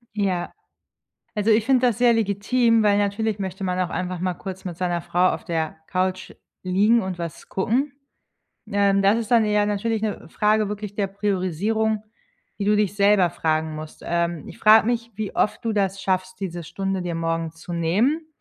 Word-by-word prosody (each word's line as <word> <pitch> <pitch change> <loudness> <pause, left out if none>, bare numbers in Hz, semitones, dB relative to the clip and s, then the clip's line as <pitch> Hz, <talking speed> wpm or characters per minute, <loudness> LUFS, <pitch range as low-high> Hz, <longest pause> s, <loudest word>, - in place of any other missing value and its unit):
Ja. 190 -4 -1 0.8
Also, 210 +2 +2
ich 215 0 +3
finde 255 -1 +3
das 230 -4 0
sehr 240 -1 +5
legitim, 225 +2 +2
weil 205 -1 +4
natürlich 205 +1 0
möchte 190 0 -4
man 180 -1 -1
auch 180 -2 0
einfach 180 0 -3
mal 185 -1 -1
kurz 190 +1 -8
mit 175 -3 -6
seiner 175 -1 -1
Frau 180 +2 +2
auf - - -6
der 160 -2 -2
Couch 185 0 -1 0.3
liegen 205 +6 +3
und 185 -3 -5
was 170 -2 -7
gucken. 250 +9 0 0.8
Ähm, 200 -1 +2
das 200 +3 +4
ist 225 -2 -4
dann 235 -2 +5
eher 210 -1 +2
natürlich 210 +2 -1
‘ne 215 -1 -3
Frage 215 +1 +2
wirklich 210 -1 -5
der 205 -1 0
Priorisierung, 205 +2 -1 0.6
die 200 - -2
du 210 +1 +3
dich 205 -2 +1
selber 200 -2 +4
fragen 160 -1 -1
musst. 155 0 -9
Ähm, 170 -2 -1
ich - - -11
frage 215 +1 +6
mich, 235 -1 -1
wie 215 -2 -4
oft 210 - +1
du 225 - 0
das 195 -1 0
schaffst, 185 0 -2
diese 175 -3 -4
Stunde 195 +3 -3
dir 175 -1 -3
morgens 165 0 -2
zu 175 - -8
nehmen 220 - +1
200 Hz, 185 wpm, -23 LUFS, 180-215 Hz, 0.8 s, frage